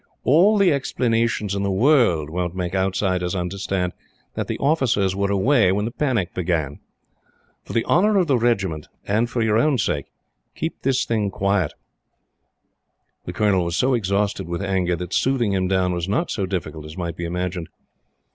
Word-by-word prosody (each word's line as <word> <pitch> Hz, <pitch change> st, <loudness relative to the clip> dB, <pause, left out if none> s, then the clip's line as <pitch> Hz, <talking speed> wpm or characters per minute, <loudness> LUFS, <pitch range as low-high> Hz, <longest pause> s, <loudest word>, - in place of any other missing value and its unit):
All 185 Hz, +10 st, +5 dB
the 195 Hz, -5 st, +4 dB
explanations 115 Hz, -6 st, 0 dB
in 100 Hz, -, -1 dB
the 100 Hz, -, 0 dB
world 95 Hz, -, +3 dB
won't 90 Hz, 0 st, -2 dB
make 90 Hz, -1 st, -3 dB
outsiders 95 Hz, -1 st, 0 dB
understand 90 Hz, 0 st, -2 dB, 0.4 s
that -, -, -3 dB
the -, -, -3 dB
officers 125 Hz, -10 st, +1 dB
were 100 Hz, 0 st, 0 dB
away 100 Hz, +1 st, +3 dB
when 105 Hz, +2 st, 0 dB
the 115 Hz, -, -3 dB
panic 120 Hz, -, -1 dB
began. 80 Hz, -6 st, -2 dB, 0.9 s
For -, -, -8 dB
the 115 Hz, -, +2 dB
honor 205 Hz, +4 st, +3 dB
of 185 Hz, -, +3 dB
the 140 Hz, -5 st, +2 dB
Regiment 95 Hz, -10 st, 0 dB, 0.2 s
and 110 Hz, +4 st, +1 dB
for 115 Hz, 0 st, -1 dB
your 110 Hz, 0 st, +2 dB
own 145 Hz, +2 st, +2 dB
sake 75 Hz, -, -1 dB, 0.5 s
keep 160 Hz, -, -4 dB
this 130 Hz, -1 st, +1 dB
thing 110 Hz, -3 st, 0 dB
quiet." 100 Hz, -4 st, 0 dB, 1.5 s
The -, -, -5 dB
Colonel 100 Hz, -4 st, +2 dB
was 85 Hz, -1 st, -2 dB
so 130 Hz, +7 st, +2 dB
exhausted 100 Hz, -5 st, 0 dB
with 85 Hz, +3 st, -3 dB
anger 95 Hz, -3 st, 0 dB
that 90 Hz, +1 st, -6 dB
soothing 125 Hz, -6 st, +1 dB
him 95 Hz, -1 st, 0 dB
down 90 Hz, -1 st, +1 dB
was 85 Hz, +1 st, -3 dB
not 165 Hz, -, 0 dB
so 100 Hz, -3 st, -2 dB
difficult 85 Hz, -4 st, -4 dB
as 75 Hz, +2 st, -10 dB
might 85 Hz, -2 st, -4 dB
be 85 Hz, -, -5 dB
imagined. 90 Hz, 0 st, -3 dB
100 Hz, 175 wpm, -22 LUFS, 90-120 Hz, 1.5 s, All